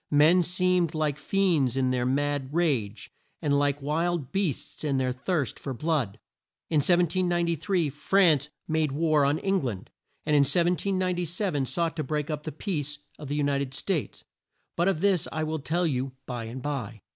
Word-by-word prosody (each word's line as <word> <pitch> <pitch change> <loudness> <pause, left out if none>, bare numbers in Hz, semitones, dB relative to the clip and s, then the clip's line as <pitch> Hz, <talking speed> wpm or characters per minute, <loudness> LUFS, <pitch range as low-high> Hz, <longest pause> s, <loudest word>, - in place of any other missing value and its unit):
Men 155 +5 +5
seemed 180 -1 +1
like 150 -2 0
fiends 160 -9 +1
in 130 -1 +2
their 125 -1 0
mad 140 0 0
rage, 120 - -1 0.3
and 145 -3 0
like 145 0 0
wild 160 -1 -1
beasts 185 -8 -2
in 140 -3 0
their 130 -1 +1
thirst 140 +3 -2
for 135 -2 -5
blood. 135 -8 -1 0.5
In 160 - +3
1793 175 0 +2
France 150 -1 +3 0.2
made 155 -3 0
war 155 -1 +3
on 145 +2 +2
Eng 195 +1 +1
land; 115 -4 -5 0.3
and 150 -1 +2
in - - +6
1797 180 -1 0
sought 165 +2 -1
to 155 - -1
break 150 +2 -2
up 150 - -3
the 155 - -3
peace 150 -4 -3 0.2
of 150 - -7
the 145 - -2
U 150 - +1
ni 140 -1 +1
ted 135 -1 -4
States, 170 -1 -2 0.5
but 175 +2 +1
of 190 -5 +1
this 195 -4 +2
I 155 - -2
will 155 0 -2
tell 170 +5 0
you 135 -3 -1
by 120 -3 -5
and 125 +3 -7
by. 120 -7 -4
150 Hz, 175 wpm, -27 LUFS, 135-175 Hz, 0.5 s, in